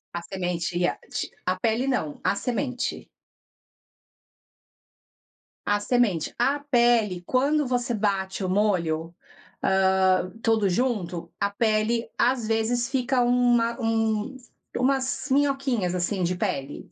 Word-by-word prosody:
A 170 - -2
semente 175 -1 -3
ia 175 0 +1
ti - - -4
a 185 0 +1
pele 230 +6 0
não, 160 - -1
a - - +2
semente. 250 +2 -3 2.6
A 205 0 +2
semente. 205 -7 +1
A 275 +4 +2
pele, 240 -9 +2
quando 285 - +2
você 245 -1 -1
bate 195 -2 -1
o 185 - -1
molho, 170 -5 0 0.5
ah, 190 -1 +3
tudo 220 -3 +2
junto, 185 -6 -1
a 200 - +1
pele 220 +2 0
às 245 -2 +2
vezes 230 +2 0
fica 260 -1 +1
uma 240 -1 +2
um 225 +2 0 0.4
umas 265 +2 0
minhoquinhas, 270 -9 +1
assim, 180 +2 -1
de 180 +1 0
pele. 160 -8 -4
220 Hz, 115 wpm, -25 LUFS, 185-245 Hz, 2.6 s, ah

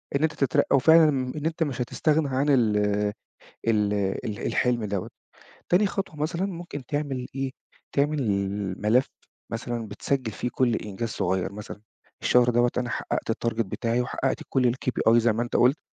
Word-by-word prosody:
إن 140 - +1
أنت 160 -1 +2
تترقى، 135 0 +2
وفعلًا 160 +3 +6
إن 135 +2 -2
أنت 165 +1 0
مش 135 -5 -3
هتستغنى 150 +4 +1
عن 135 +2 +1
ال 115 -7 +3 0.9
ال 105 -2 +2 0.5
الحلم 120 -3 +1
دوًة. 100 -3 -3 0.6
تاني 190 +4 +4
خطوة 195 -4 -4
مثلًا 170 +5 -1
ممكن 170 -8 -7
تعمل 140 -3 -2
إيه، 135 0 -2 0.4
تعمل 145 +2 +1
ال 100 -3 -2
ملف 120 +5 +3 0.4
مثلًا 115 -1 -3
بتسجّل 130 -3 -2
فيه 125 - -3
كل 125 -3 +2
إنجاز 105 +2 -4
صُغير، 95 -2 -1
مثلًا، 105 0 -8 0.4
الشهر 125 0 +4
دوّة 120 0 +3
أنا 125 -1 -2
حققت - - -2
الtarget 115 0 -1
بتاعي، 115 +4 -1
وحققت 130 +1 -2
كُل 125 -3 +2
الKPI 125 -3 +1
زي 120 -1 +4
ما 115 +2 -1
أنت 120 - -1
قُلت، 130 +5 +4
125 Hz, 160 wpm, -26 LUFS, 115-145 Hz, 0.9 s, وفعلًا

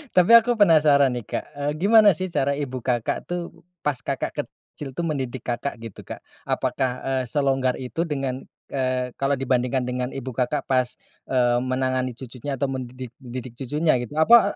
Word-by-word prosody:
Tapi 180 +4 +5
aku 240 +1 0
penasaran 150 - +5
nih, 120 -2 -4
Kak, - - -3
eee, 145 +1 -2
gimana 205 +2 +6
sih 185 +1 -4
cara 140 -2 +1
ibu 130 -3 -4
Kakak 120 -2 -1
tuh, 175 -1 -4 0.3
pas 145 -3 +1
Kakak - - -2
kecil 135 -3 -8
tuh, 170 - -2
mendidik 130 -6 -3
Kakak, 125 +3 -3
gitu 115 -3 -9
Kak? - - -8 0.2
Apakah, 130 -2 0
eee, 135 -1 0
selonggar 135 -1 +1
itu 160 +7 -3
dengan, 135 -3 -3 0.2
eee, 130 -1 -1
kalau 140 +1 +2
dibandingkan 130 0 0
dengan 125 0 -2
Ibu 130 -1 -5
Kakak 125 +1 -1
pas, 130 -2 +1 0.3
eee, 120 -2 +2
menangani 130 -1 -1
cucunya 130 +2 -6
atau 135 +1 -1
mendidik 130 -1 -6
mendidik 125 -1 -7
cucunya 150 +1 +1
gitu? 120 +5 -6
Apa, 225 +9 +6
130 Hz, 170 wpm, -24 LUFS, 125-150 Hz, 0.3 s, gimana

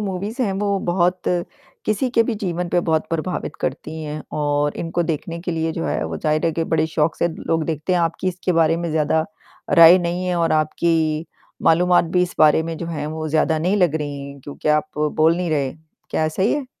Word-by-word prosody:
Movies 200 +4 -4
हैं 205 -5 0
वो 200 0 0
बहुत 180 +1 +1 0.6
किसी 215 +5 0
के 230 - +4
भी 225 0 -2
जीवन 180 -4 -3
पर 175 - +2
बहुत 160 -2 0
प्रभावित 165 +2 -3
करती 160 +1 -4
हैं 150 0 -5 0.2
और 145 0 0
इनको 170 +1 -1
देखने 165 +1 -3
के 175 - -4
लिए 165 0 -1
जो 80 - -4
है 75 +1 -1
वो 80 0 -4
ज़ाहिर 155 - 0
है - - +2
कि 165 +1 -1
बड़े 160 -1 +1
शौक़ 160 0 0
से 170 - +2
लोग 160 -1 -2
देखते 160 +3 -2
हैं 180 - +2
आपकी 170 +2 -1
इसके 185 0 -2
बारे 165 -1 +3
में 170 0 -3
ज़्यादा 155 0 +1 0.5
राय 170 0 +8
नहीं 175 +1 -2
है 180 - 0
और 165 -1 +1
आपकी 155 0 +1 0.4
मालूमात 175 +2 +4
भी 180 - +5
इस 180 - -3
बारे 155 0 +5
में 165 0 -4
जो 170 - -5
है 150 -3 -4
वो 155 +1 -4
ज़्यादा 160 +1 +2
नहीं 180 +6 +1
लग 180 -6 +2
रही 145 -2 -4
हैं 140 0 -9
क्योंकि 145 +3 -6
आप 150 0 +2 0.3
बोल 160 +2 +4
नहीं 180 -1 -2
रहे। 140 -4 0 0.4
क्या 155 - +1
सही 190 +7 0
है? 290 -3 -2
165 Hz, 220 wpm, -21 LUFS, 155-180 Hz, 0.6 s, राय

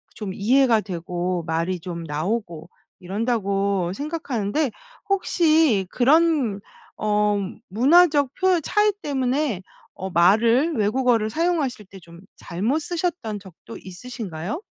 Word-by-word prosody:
좀 205 -4 -5
이해가 235 +2 +3
되고 180 -1 -3
말이 165 +3 -1
좀 170 0 -6
나오고 165 +2 -3 0.3
이런다.'고 200 -2 -1
생각하는데 285 - -2 0.4
혹시 320 - +2
그런 275 -5 +3 0.4
어 210 -1 +1 0.3
문화적 285 - +4
표현 370 -2 +2
차이 420 +7 +2
때문에 265 - -1 0.3
어 190 - -6
말을 230 - +3
외국어를 225 0 +1
사용하실 305 -6 -1
때 195 +1 -13
좀 170 0 -15 0.2
잘못 210 - -2
쓰셨던 330 - -3
적도 190 -4 -12
있으신가요? 190 - -7
220 Hz, 250 characters per minute, -23 LUFS, 185-290 Hz, 0.4 s, 문화적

